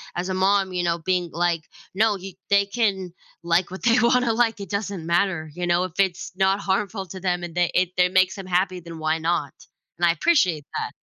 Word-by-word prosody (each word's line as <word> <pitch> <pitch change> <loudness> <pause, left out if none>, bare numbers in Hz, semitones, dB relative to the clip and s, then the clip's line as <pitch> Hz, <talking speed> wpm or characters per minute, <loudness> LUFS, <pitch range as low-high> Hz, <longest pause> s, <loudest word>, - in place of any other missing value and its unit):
as 180 +2 -3
a - - -1
mom, 190 0 +2
you 180 - -1
know, 170 -1 +1
being 180 0 -1
like, 170 -1 -1 0.3
"No, 215 0 +3
y 190 +1 -8 0.2
they 200 0 +4
can 195 -4 -1 0.3
like 170 +1 +1
what 190 - -8
they 235 0 +4
wanna 240 0 +3
like, 225 -2 +1
it 200 - -7
doesn't 200 -4 -3
matter, 170 -2 0
you 175 0 -3
know, 175 +1 +2
if 180 - -8
it's 190 -2 0
not 190 +1 +2
harmful 195 0 -1
to 190 +3 -8
them 180 -2 -1
and 175 -1 -7
they 175 -1 +1
it 185 -1 +2
it 180 0 +3
makes 185 +1 +3
them 195 -2 -8
happy, 185 0 0
then 165 -1 -9
why 155 +1 0
not? 160 -4 -1 0.4
And 175 - +2
I 170 - +5
appreciate 170 - +2
that. - - -3
185 Hz, 225 wpm, -23 LUFS, 175-200 Hz, 0.4 s, I